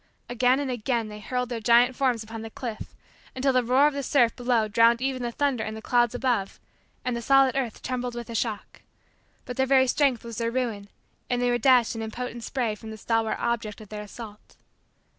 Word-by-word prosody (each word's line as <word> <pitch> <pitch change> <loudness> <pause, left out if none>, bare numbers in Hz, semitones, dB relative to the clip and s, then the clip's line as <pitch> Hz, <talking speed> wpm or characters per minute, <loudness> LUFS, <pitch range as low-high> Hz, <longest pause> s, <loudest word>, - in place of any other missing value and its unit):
Again 250 +2 +2
and 280 -2 -2
again 235 -2 -1
they 210 0 -9
hurled 250 +3 -3
their 240 -2 -3
giant 240 +3 +4
forms 250 -4 +1
upon 225 +1 -8
the 225 - -7
cliff, 230 -1 -7 0.4
until 265 +1 +1
the 255 -1 +3
roar 255 +4 +4
of 300 - +3
the 280 - -3
surf 255 -3 +2
below 245 -3 +1
drowned 230 +2 +4
even 260 0 -2
the 240 -1 -2
thunder 270 -3 0
in 215 - -5
the - - -6
clouds 240 -1 +2
above 245 -6 -1 0.5
and 250 -1 -1
the 235 - -3
solid 270 +1 +4
earth 250 -5 -3
trembled 250 -1 -3
with 240 0 -5
the 230 - -8
shock, 225 -2 -3 0.6
but 250 -2 -7
their 265 0 +2
very 260 -1 +5
strength 260 -2 +1
was 230 -2 -7
their 230 0 0
ruin 230 -5 -3 0.4
and 245 - 0
they 245 0 +1
were 240 - +1
dashed 245 -2 +4
in 225 - -4
impotent 235 +1 -5
spray 240 -4 -1
from 220 +1 -10
the 220 - -7
stalwart 225 0 0
object 225 -2 -2
of 215 -2 -12
their 210 -1 -6
assault. 210 0 -11
240 Hz, 215 wpm, -26 LUFS, 225-255 Hz, 0.6 s, very